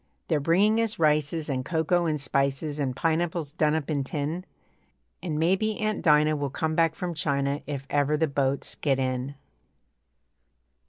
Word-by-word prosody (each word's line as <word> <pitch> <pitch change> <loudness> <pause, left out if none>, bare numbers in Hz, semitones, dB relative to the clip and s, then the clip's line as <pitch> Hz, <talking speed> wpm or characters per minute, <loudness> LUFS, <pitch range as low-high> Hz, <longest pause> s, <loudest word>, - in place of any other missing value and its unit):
They're 155 -3 +2
bringing 200 +9 +3
us 225 -2 -1
rices 155 0 +1
And 130 -3 -2
cocoa 170 +3 +1
and 155 -2 0
spices 140 +2 -1
And 130 -3 -1
pineapples 165 -1 -1
done 155 0 +2
up 160 -3 -2
in 140 -2 0
tin, 150 +6 -3 0.8
And 160 -5 -3
maybe 190 +7 +1
Aunt 215 -1 -1
Dinah 150 -1 +4
Will 145 -1 -2
come 160 +3 -2
back 165 0 +2
from 180 -1 -3
China 140 -2 -1
If 140 -2 -4
ever 145 +1 +1
the 160 - +2
boats 140 -2 -1
get 140 -3 0
in. 130 +1 -2
150 Hz, 160 wpm, -26 LUFS, 140-165 Hz, 0.8 s, Dinah